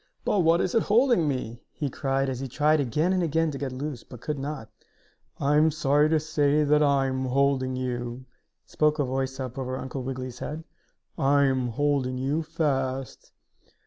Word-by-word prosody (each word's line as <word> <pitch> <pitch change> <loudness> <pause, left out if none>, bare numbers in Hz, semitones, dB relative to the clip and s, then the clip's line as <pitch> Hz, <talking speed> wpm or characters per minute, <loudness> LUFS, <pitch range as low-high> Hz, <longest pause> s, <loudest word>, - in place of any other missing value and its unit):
"But 205 - +2
what 165 -1 +4
is 185 - -1
it 230 - +4
holding 230 - +3
me?" 120 -4 -3
he 145 - -3
cried, 135 0 -1
as 130 -2 -3
he 135 - -4
tried 150 +4 +2
again 150 +7 +1
and 185 - +1
again 165 -1 +1
to 140 - -6
get 140 -2 -3
loose, 130 -1 -5
but 125 - -12
could 150 +3 -4
not. 140 -4 -5 0.7
"I 145 +1 +2
am 155 +1 +5
sorry 150 -1 +2
to 160 0 +3
say 150 -1 +2
I 145 -2 +3
am 130 0 -1
holding 130 0 +1
you!" 125 0 -4 0.4
spoke 150 0 +1
a 145 - +1
voice 130 +1 -2
up 130 0 -5
over 130 0 -3
Uncle 130 +1 -5
Wiggily's 130 -1 -5
head. 155 +2 -5 0.6
"I 140 +1 +4
am 130 -2 +1
holding 130 +1 0
you 140 +5 0
fast!" 135 -5 -2
140 Hz, 180 wpm, -26 LUFS, 130-150 Hz, 0.7 s, am